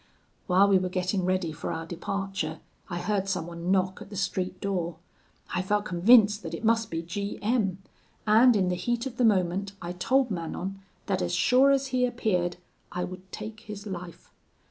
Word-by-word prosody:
"While 190 +2 +5
we 195 -2 +5
were 185 0 -2
getting 185 +1 -1
ready 185 -3 0
for - - -5
our 165 0 -4
departure, 175 -2 -3 0.3
I 175 - -3
heard 195 +1 -1
someone 175 -1 -3
knock 190 0 +1
at - - -10
the 205 - -8
street 185 -1 -2
door. 175 -4 -2 0.6
I - - +1
felt 205 +2 0
convinced 205 +3 +5
that 165 -4 -5
it - - -6
must 225 -1 +2
be 165 0 -3
G 200 +4 -4
M; 200 -5 0 0.4
and 225 +3 +6
in 190 -3 +2
the 180 - 0
heat 240 +6 -1
of 250 -2 -6
the 250 - +2
moment, 195 -2 +2
I 175 -2 -5
told 250 +8 +1
Manon, 185 +2 -4 0.2
that 190 -2 0
as 175 0 0
sure 255 +8 +5
as 275 -1 +2
he 250 0 +3
appeared 185 -8 0 0.3
I 180 0 -2
would 185 +1 -8
take 215 +1 -7
his 210 -2 -9
life. 180 -4 -8
195 Hz, 190 wpm, -27 LUFS, 180-215 Hz, 0.6 s, and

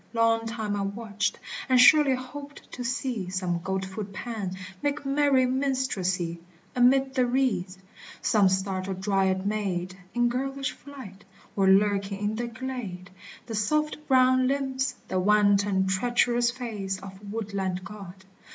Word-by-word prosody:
Long 225 0 +2
time 220 -3 -3
I 200 - -1
watched, 205 0 -2 0.3
and 255 -1 +5
surely 275 +1 +7
hoped 280 +3 -9
to 250 - -6
see 240 -5 -2
Some 180 -2 -2
goat 190 +1 -2
foot 195 +1 -6
Pan 200 -2 -5 0.3
make 290 0 -1
merry 275 -2 +3
minstrelsy 230 -10 -1 0.4
Amid 265 +2 +4
the 255 -2 +2
reeds! 215 -8 0 0.4
some 205 -3 +3
startled 190 0 -2
Dryad 190 -1 +1
maid 190 -4 -2 0.2
In 240 0 +3
girlish 270 +3 -2
flight! 260 -9 -12 0.3
or 195 -1 +3
lurking 200 0 +3
in - - -4
the 240 +1 -3
glade, 235 -7 -6 0.3
The 230 - -7
soft 300 +9 0
brown 255 -1 +4
limbs, 265 -1 -1
the 185 - 0
wanton 200 -1 +3
treacherous 240 +4 +2
face 220 -6 -4
Of 190 0 -10
woodland 195 -4 -3
god 190 -2 -10
215 Hz, 135 wpm, -27 LUFS, 190-255 Hz, 0.4 s, surely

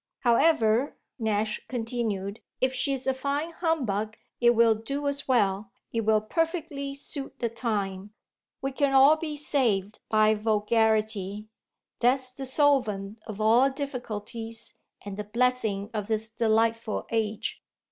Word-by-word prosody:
However," 240 -1 +3 0.2
Nash 215 -1 0
continued, 225 -4 -3 0.2
"if 260 0 +1
she's 265 -1 0
a 265 - +2
fine 280 +5 -2
humbug 235 - -1 0.2
it 240 0 +5
will 230 0 +5
do 275 +7 -4
as 280 0 -2
well, 210 -4 +2 0.2
it 230 - +1
will 215 -1 +3
perfectly 295 - -2
suit 280 0 -6
the 235 - -1
time. 205 -4 -3 0.5
We 270 - -1
can 275 0 +1
all 275 +3 +8
be 310 -1 -4
saved 230 -9 0
by 215 0 +4
vulgarity; 215 -1 +1 0.5
that's 255 +1 +2
the 265 +1 -4
solvent 235 -8 +1
of 215 -1 -7
all 230 +5 +5
difficulties 230 -4 -6 0.3
and 200 -1 -6
the 210 - -3
blessing 220 -2 0
of 210 -2 -3
this 220 0 -1
delightful 225 0 +1
age. 220 -2 -2
230 Hz, 130 wpm, -27 LUFS, 215-270 Hz, 0.5 s, all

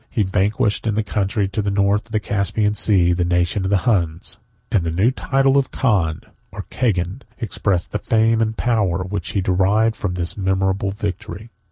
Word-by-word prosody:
He 110 - 0
vanquished, 100 +3 0
in 105 - 0
the 110 - +1
country 100 -1 -1
to 100 +3 -2
the 100 - -1
north 100 +2 +1
of - - -20
the 110 - +1
Caspian 105 +1 0
Sea, 95 -4 +3
the 90 0 0
nation 90 +2 0
of - - -1
the 100 -2 +1
Huns; 95 -3 0 0.3
and 100 -7 +2
the 85 - -1
new 95 +9 +2
title 135 +1 +2
of 135 - -2
Khan, 95 - 0 0.3
or - - -7
Cagan, 100 -1 -1 0.2
expressed 100 -5 -1
the 105 - -2
fame 115 +1 +2
and 110 0 -1
power 100 -7 +1
which 95 -1 -4
he 100 - +1
derived 100 +5 +2
from 95 -3 -3
this 85 -1 -3
memorable 95 0 0
victory. 100 +1 -6
100 Hz, 190 wpm, -20 LUFS, 95-110 Hz, 0.3 s, Sea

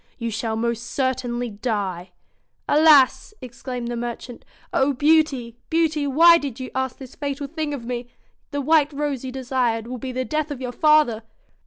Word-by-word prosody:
' - - -40
You 230 -2 -3
shall 220 +1 -2
most 235 0 -1
certainly 245 -2 -2
die.' 200 -5 -3 0.6
'Alas!' 300 +5 +5
exclaimed 250 -1 -6
the 240 - -3
merchant. 240 +1 -6 0.3
'Oh, 275 +1 +2
Beauty! 275 -5 +2
Beauty! 315 -3 +1
why 335 +5 +6
did 275 -4 -6
you 255 - -6
ask 260 -1 -2
this 265 -3 -11
fatal 285 0 -4
thing 310 +1 -4
of 270 -5 -5
me? 240 0 -4 0.4
The 285 -1 -3
white 300 +1 +3
rose 285 -3 -2
you 260 - -5
desired 250 -3 -1
will 250 +1 -6
be 260 +2 -5
the 255 +1 -3
death 310 +1 -2
of 285 -3 -5
your 250 -2 -4
father.' 300 -5 +3
260 Hz, 175 wpm, -22 LUFS, 240-290 Hz, 0.6 s, why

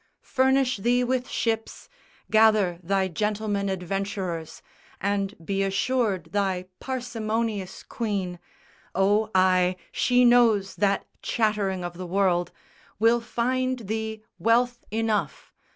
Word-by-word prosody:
Furnish 265 -1 +3
thee 245 +5 +2
with 250 0 -1
ships, 225 -1 -2 0.4
Gather 215 -5 +4
thy 190 +2 +1
gentleman 205 +2 -1
adventurers, 190 -3 -4 0.4
And 200 0 -1
be 195 +1 -1
assured 195 -3 0
thy 190 -3 0
parsimonious 225 -6 -3
queen 195 -6 -3 0.6
Oh 205 +3 +2
ay, 185 -1 +4 0.2
she 250 0 +3
knows 230 -5 +4
that 200 -1 +1 0.2
chattering 210 -5 0
of 175 0 -6
the 185 - -5
world 180 -1 +1 0.5
Will 230 +2 +3
find 255 +2 -1
thee 220 0 -4 0.2
wealth 240 +1 +2
enough. 220 -1 -2
210 Hz, 105 wpm, -25 LUFS, 190-235 Hz, 0.6 s, Gather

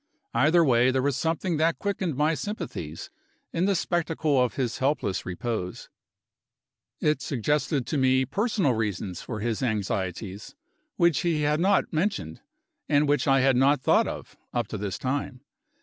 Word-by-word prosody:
Either 155 +8 +4
way, 125 -2 +4
there 130 0 +1
was 140 -2 +1
something 165 +2 -1
that 160 +2 +2
quickened 195 -6 -2
my 150 +4 +2
sympathies, 135 - -5 0.4
in 170 +2 +1
the 200 0 +2
spectacle 160 -5 +1
of 125 - -2
his 125 -4 -2
helpless 130 -8 -1
repose. 90 0 -4 1.1
It 150 0 +1
suggested 145 +1 0
to 150 - -1
me 130 0 +3
personal 200 - +1
reasons 100 -5 -3
for 110 -3 -6
his 115 -1 -2
anxieties, 100 - -3 0.4
which 170 -5 +3
he 165 -3 0
had 150 +1 +2
not 195 +1 +2
mentioned, 155 - -2 0.5
and 145 0 +3
which 145 -1 +1
I 135 -1 +4
had 135 0 +4
not 135 +3 +4
thought - - +3
of, - - -7 0.2
up 120 -1 -1
to 105 - -4
this 100 -2 -3
time. 130 -1 -3
135 Hz, 155 wpm, -26 LUFS, 115-160 Hz, 1.1 s, Either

